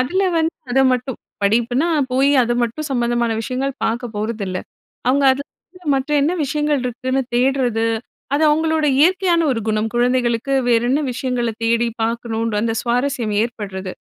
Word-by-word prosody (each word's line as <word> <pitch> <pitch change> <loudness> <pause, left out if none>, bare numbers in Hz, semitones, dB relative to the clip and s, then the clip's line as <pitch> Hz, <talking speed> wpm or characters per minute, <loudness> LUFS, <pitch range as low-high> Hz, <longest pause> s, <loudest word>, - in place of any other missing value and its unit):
அதில 360 +10 +1 0.2
வந்து 325 +1 0 0.2
அதமட்டும் 260 -1 +2 0.3
படிப்புனா 240 +9 +2 0.2
போயி, 275 +2 +3
அத 240 - 0
மட்டும் 290 +7 -3
சம்மந்தமான 240 -2 0
விஷயங்கள் 260 +3 -2
பாக்க 230 +3 -1
போறதில்ல. 210 -4 -3 0.5
அவுங்க, 275 +2 +3
அதில 335 +6 -10
மற்ற 270 +3 -3
என்ன 315 - +2
விஷயங்கள் 295 0 0
இருக்குன்னு 255 +2 -1
தேட்றது. 245 -3 +1 0.5
அது 305 - +1
அவங்களோட 315 0 +1
இயற்கையான 355 +1 +3
ஒரு 225 - -2
குணம். 215 +1 0
குழந்தைகளுக்கு 245 +1 +1 0.2
வேறென்ன 240 +4 +2
விஷயங்கள 245 -2 -1
தேடி 235 +1 +2
பார்க்கணுன்ற 230 -1 -2
அந்த 225 -1 0
சுவாரஸ்யம் 245 -3 -1
ஏற்படுறது. 195 -5 -5
250 Hz, 130 wpm, -19 LUFS, 230-275 Hz, 0.5 s, போயி